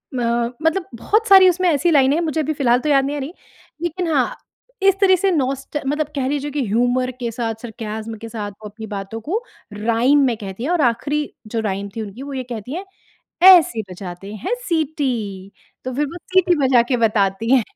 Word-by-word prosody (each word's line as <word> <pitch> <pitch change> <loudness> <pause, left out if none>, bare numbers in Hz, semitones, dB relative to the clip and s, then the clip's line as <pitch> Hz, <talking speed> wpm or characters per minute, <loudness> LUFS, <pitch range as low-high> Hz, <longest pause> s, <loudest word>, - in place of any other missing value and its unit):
म 235 0 0
मतलब 335 +3 +1
बहुत 430 - 0
सारी 380 -1 +8
उसमें 365 +1 +1
ऐसी 335 +3 +2
लाइनें 275 -1 +4
हैं 340 - 0
मुझे 315 0 -1
अभी 310 +1 -1
फिलहाल 250 -4 +2
तो 300 - -2
याद 275 -1 +4
नहीं 290 +1 -2
आ - - -3
रही, 285 +6 -6 0.5
लेकिन 345 +1 -2
हाँ, 260 -3 +1 0.5
इस 390 -1 +5
तरह 375 -1 +6
से 385 +2 +1
नॉस्ट 275 -1 -1
मतलब 295 +1 0
कह 260 -2 -1
लीजिए 290 +1 -2
कि 280 -4 -1
ह्यूमर 245 +4 +1
के 235 -1 -2
साथ 225 -1 -3
सरकैज़म 220 -1 -6
के 230 - -7
साथ 210 -2 -5
वो 210 +2 -11
अपनी 220 +2 -9
बातों 200 +2 -6
को 395 - -2 0.3
राइम 230 +7 +2
में 240 -3 +1
कहती 200 +2 -7
है 300 - -2
और 345 -4 +2
आखिरी 290 +5 +1 0.3
जो 225 +1 -3
राइम 200 -1 -3
थी 225 - -3
उनकी 215 +5 -8
वो 280 0 -7
ये 260 -1 -3
कहती 235 +4 -5
हैं 385 +2 -5 0.6
ऐसे 350 -10 +6
बजाते 185 +2 -8
हैं 295 - -3 0.2
सिटी। 250 - -2 0.3
तो 255 - -3
फिर 295 +1 +1
वो 345 - -8 0.2
सीटी 365 -2 +4
बजा 250 -2 +5
के 250 - +3
बताती 215 -1 +1
है। 240 - +3
255 Hz, 210 wpm, -20 LUFS, 225-310 Hz, 0.6 s, सारी